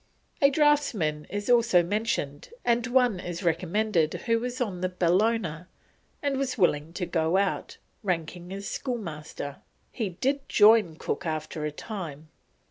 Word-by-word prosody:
A 280 Hz, -, +7 dB
draughtsman 275 Hz, -, +2 dB
is 205 Hz, +1 st, -4 dB
also 235 Hz, -7 st, +5 dB
mentioned, 175 Hz, -7 st, -2 dB, 0.2 s
and 240 Hz, +1 st, +2 dB
one 245 Hz, -5 st, +3 dB
is 175 Hz, 0 st, -5 dB
recommended 175 Hz, 0 st, +1 dB
who 230 Hz, -1 st, 0 dB
was 250 Hz, +2 st, -4 dB
on 200 Hz, -8 st, -2 dB
the 185 Hz, -, 0 dB
Bellona 180 Hz, -1 st, +1 dB, 0.6 s
and 280 Hz, -2 st, 0 dB
was 270 Hz, -2 st, -1 dB
willing 160 Hz, -5 st, +2 dB
to 180 Hz, -, -2 dB
go 165 Hz, +1 st, +1 dB
out, 195 Hz, -1 st, -1 dB, 0.2 s
ranking 175 Hz, -2 st, -3 dB
as 200 Hz, +1 st, -5 dB
schoolmaster; 155 Hz, -, -5 dB, 0.3 s
he 220 Hz, -5 st, -2 dB
did 270 Hz, +10 st, -2 dB
join 210 Hz, -6 st, +6 dB
Cook 170 Hz, -, -3 dB
after 155 Hz, -1 st, -3 dB
a 150 Hz, -, -2 dB
time. 160 Hz, -4 st, -7 dB
190 Hz, 140 wpm, -27 LUFS, 165-230 Hz, 0.6 s, A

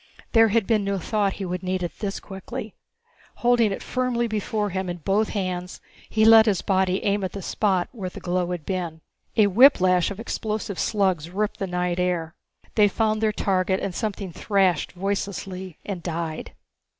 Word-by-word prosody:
There 225 Hz, -1 st, +6 dB
had 220 Hz, -1 st, +2 dB
been 215 Hz, -2 st, +2 dB
no 200 Hz, 0 st, -1 dB
thought 200 Hz, +2 st, 0 dB
that -, -, -11 dB
he 195 Hz, -, -4 dB
would 180 Hz, 0 st, -3 dB
need 185 Hz, 0 st, -2 dB
it 175 Hz, -, -5 dB
this 200 Hz, -2 st, -3 dB
quickly. 195 Hz, +2 st, -7 dB, 0.6 s
Holding 240 Hz, -3 st, +3 dB
it 195 Hz, -, -4 dB
firmly 250 Hz, -2 st, 0 dB
before 210 Hz, -1 st, -2 dB
him 190 Hz, 0 st, -2 dB
in 175 Hz, -, -3 dB
both 195 Hz, +6 st, +1 dB
hands, 180 Hz, -2 st, -3 dB, 0.3 s
he 220 Hz, 0 st, +3 dB
let 225 Hz, 0 st, +8 dB
his 200 Hz, -4 st, +1 dB
body 190 Hz, -1 st, +1 dB
aim 200 Hz, 0 st, +1 dB
at 185 Hz, -, -3 dB
the 200 Hz, -, -5 dB
spot 190 Hz, -3 st, +1 dB
where 200 Hz, -7 st, -5 dB
the -, -, -10 dB
glow 180 Hz, 0 st, -1 dB
had 175 Hz, -4 st, -4 dB
been. 175 Hz, -4 st, -3 dB, 0.4 s
A 215 Hz, -, +6 dB
whiplash 185 Hz, -5 st, +5 dB
of 200 Hz, 0 st, -7 dB
explosive 215 Hz, -3 st, -3 dB
slugs 185 Hz, -7 st, +1 dB
ripped 205 Hz, +3 st, -2 dB
the 195 Hz, -, -2 dB
night 180 Hz, 0 st, -1 dB
air. 175 Hz, -3 st, -1 dB, 0.4 s
They 210 Hz, -2 st, +5 dB
found 215 Hz, +1 st, 0 dB
their 220 Hz, -1 st, +3 dB
target 190 Hz, -2 st, 0 dB
and 195 Hz, -, -3 dB
something 200 Hz, -3 st, -4 dB
thrashed 190 Hz, -5 st, +1 dB
voicelessly 190 Hz, -1 st, -4 dB
and 195 Hz, -4 st, -4 dB
died. 165 Hz, -2 st, -4 dB
195 Hz, 185 wpm, -24 LUFS, 180-215 Hz, 0.6 s, let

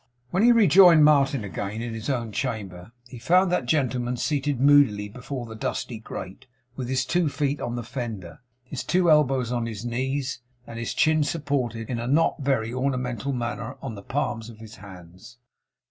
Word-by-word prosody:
When 185 Hz, -, +1 dB
he 240 Hz, +2 st, +6 dB
rejoined 180 Hz, -7 st, +7 dB
Martin 140 Hz, -4 st, +3 dB
again 100 Hz, +3 st, -5 dB
in 120 Hz, -1 st, -5 dB
his 115 Hz, +3 st, -5 dB
own 120 Hz, -5 st, -2 dB
chamber, 105 Hz, -6 st, -4 dB, 0.2 s
he 125 Hz, -1 st, -10 dB
found 180 Hz, +8 st, +3 dB
that 155 Hz, -9 st, 0 dB
gentleman 125 Hz, -3 st, 0 dB
seated 145 Hz, -1 st, -1 dB
moodily 135 Hz, -7 st, +4 dB
before 125 Hz, +3 st, -7 dB
the 115 Hz, -, -9 dB
dusty 110 Hz, +1 st, -4 dB
grate, 110 Hz, +3 st, -9 dB, 0.3 s
with 125 Hz, -2 st, -5 dB
his 130 Hz, 0 st, 0 dB
two 170 Hz, +3 st, +1 dB
feet 145 Hz, 0 st, -2 dB
on 120 Hz, -, -3 dB
the 120 Hz, -, -4 dB
fender, 115 Hz, -, -6 dB, 0.2 s
his 125 Hz, +1 st, -6 dB
two 180 Hz, -2 st, +2 dB
elbows 135 Hz, -5 st, +3 dB
on 120 Hz, -2 st, -1 dB
his 110 Hz, 0 st, -6 dB
knees, 130 Hz, +2 st, -2 dB, 0.2 s
and 115 Hz, -1 st, -8 dB
his 115 Hz, -, -4 dB
chin 155 Hz, -1 st, +3 dB
supported, 135 Hz, -8 st, -2 dB
in 120 Hz, -2 st, -3 dB
a 120 Hz, -, -4 dB
not 160 Hz, +5 st, +2 dB
very 130 Hz, -5 st, 0 dB
ornamental 130 Hz, -1 st, -2 dB
manner, 120 Hz, +1 st, -4 dB
on 135 Hz, -4 st, -6 dB
the 100 Hz, -, -9 dB
palms 120 Hz, -2 st, -3 dB
of 115 Hz, -, -12 dB
his 110 Hz, 0 st, -12 dB
hands. 95 Hz, +4 st, -13 dB
125 Hz, 180 wpm, -25 LUFS, 115-140 Hz, 0.3 s, rejoined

